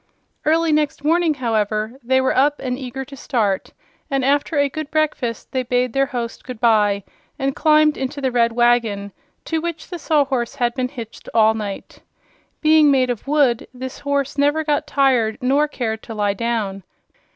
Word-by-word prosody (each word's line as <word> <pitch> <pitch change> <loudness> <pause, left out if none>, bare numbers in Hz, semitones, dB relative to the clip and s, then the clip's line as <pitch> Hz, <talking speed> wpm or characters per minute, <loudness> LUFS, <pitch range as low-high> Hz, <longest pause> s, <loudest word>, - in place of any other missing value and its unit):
Early 325 +1 +3
next 300 -1 0
morning, 325 0 +2
however, 220 -1 -1
they 260 +2 +2
were 260 - +1
up 290 +2 +3
and 250 -2 -2
eager 265 0 -6
to 275 +1 -11
start, 215 -8 -1 0.4
and 270 -3 0
after 285 +2 +1
a 285 0 +3
good 305 +1 -6
breakfast 290 -7 -1
they 260 - 0
bade 250 -1 0
their 275 0 +2
host 240 -4 -5
good 255 -3 -8
bye 210 -4 +3 0.3
and 270 -1 -1
climbed 305 -1 +4
into 270 +2 -4
the 265 -2 0
red 235 -1 +2
wagon, 230 -4 +1 0.3
to 320 -1 -1
which 335 -1 -5
the 350 - -5
Sawhorse 275 -6 0
had 240 -3 0
been 255 -1 -2
hitched 235 -5 -9
all 220 -1 +5
night. 210 -3 -6 0.6
Being 310 -1 +5
made 260 -2 +3
of 240 +2 -6
wood, 280 -5 +2
this 260 +1 -7
horse 280 0 -2
never 290 +2 +2
got 300 0 0
tired 255 -7 +2
nor 275 +3 +2
cared 220 -6 -3
to 225 - -8
lie 205 -1 +1
down. 210 -3 -2
260 Hz, 175 wpm, -20 LUFS, 235-290 Hz, 0.6 s, all